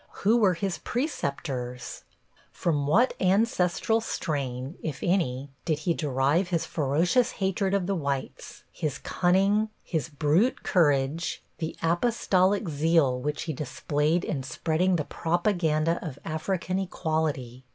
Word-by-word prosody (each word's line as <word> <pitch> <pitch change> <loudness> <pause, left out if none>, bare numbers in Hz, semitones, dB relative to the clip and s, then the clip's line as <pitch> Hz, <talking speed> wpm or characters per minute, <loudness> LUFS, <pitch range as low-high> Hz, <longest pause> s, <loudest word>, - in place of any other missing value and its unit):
Who 225 +4 +5
were 200 -6 +4
his 190 +1 -2
preceptors? 135 - -3 0.5
From 145 -5 0
what 230 - +4
ancestral 190 +2 +2
strain, 135 - -3
if 155 -4 -4
any, 140 -7 0
did 160 -3 0
he 165 +3 0
derive 145 +4 +1
his 170 -2 0
ferocious 165 - +1
hatred 195 0 0
of 195 -3 0
the 195 - 0
whites, 140 -6 -4
his 145 -3 -3
cunning, 195 +7 +2
his 160 -2 -2
brute 155 - +1
courage, 145 -1 +1 0.2
the 160 -1 -3
apostolic 190 +1 +2
zeal 150 -4 +2
which 150 +2 -2
he 165 -2 -3
displayed 150 +4 0
in 140 - -2
spreading 160 +8 0
the 155 -4 -1
propaganda 170 -2 +1
of 150 -6 -6
African 180 +3 -2
equality? 155 -9 -2
165 Hz, 125 wpm, -27 LUFS, 145-185 Hz, 0.5 s, Who